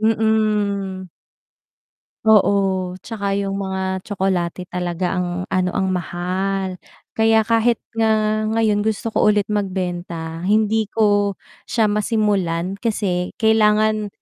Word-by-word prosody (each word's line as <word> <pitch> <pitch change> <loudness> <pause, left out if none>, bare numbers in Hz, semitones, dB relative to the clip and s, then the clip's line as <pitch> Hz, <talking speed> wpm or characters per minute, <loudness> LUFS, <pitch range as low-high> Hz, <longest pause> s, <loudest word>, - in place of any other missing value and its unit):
Mm. 210 -3 0 1.2
Oo, 195 -4 +3
'tsaka 200 -3 -3
'yung 195 0 -2
mga 190 -1 -2
tsokolate 185 -3 -2
talaga 180 0 -2
ang 180 - 0 0.3
ano 185 -1 +1
ang 190 -1 +1
mahal. 185 +2 -2 0.3
Kaya 220 0 +3
kahit 230 +1 +2 0.2
nga 215 -1 +1
ngayon 220 -2 +1
gusto 220 +1 -1
ko - - +3
ulit 210 -1 +3
magbenta 175 -4 -3
hindi 215 +1 +2
ko 205 -2 +2 0.3
siya 225 -2 +2
masimulan. 200 -4 0
Kasi 195 -6 -1
kailangan 215 -1 +3
200 Hz, 105 wpm, -20 LUFS, 185-215 Hz, 1.2 s, Oo